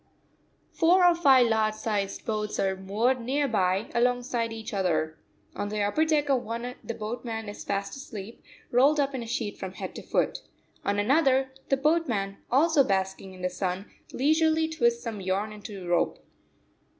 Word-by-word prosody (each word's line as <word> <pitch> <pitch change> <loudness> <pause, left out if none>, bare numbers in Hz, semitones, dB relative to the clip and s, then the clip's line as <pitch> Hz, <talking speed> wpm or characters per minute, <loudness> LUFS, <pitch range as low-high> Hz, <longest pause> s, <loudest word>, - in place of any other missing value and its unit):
Four 355 +2 +4
or 350 - +7
five 270 -7 +5
large 220 -1 +1
sized 205 -3 -2
boats 215 -1 -2
are 190 -1 +1
moored 215 +7 0
near 280 +4 0
by, 195 -2 0
alongside 245 -1 +1
each 225 -1 -7
other. 160 -5 0 0.4
On 205 - -3
the 210 0 -1
upper 255 +11 +2
deck 300 -2 +2
of 270 -3 +2
one 235 +2 -4
the 230 - -5
boatman 225 0 -5
is 205 - -7
fast 200 0 -3
asleep, 225 -5 -9 0.3
rolled 275 +5 +4
up 280 -1 +1
in 260 - -3
a 230 - -6
sheet 225 -2 -3
from 190 -1 -5
head - - -6
to - - -7
foot. - - 0 0.4
On 205 - 0
another, 265 +3 +3 0.2
the 270 - +3
boatman 265 -10 0
also 290 +3 +4
basking 190 -2 -2
in 185 - -11
the 180 - +1
sun 185 +1 -3 0.2
leisurely 315 +3 +2
twists 235 -7 +1
some 220 -4 -5
yarn 195 +3 -1
into 205 -2 -8
rope. 175 0 +1
230 Hz, 170 wpm, -27 LUFS, 200-270 Hz, 0.4 s, or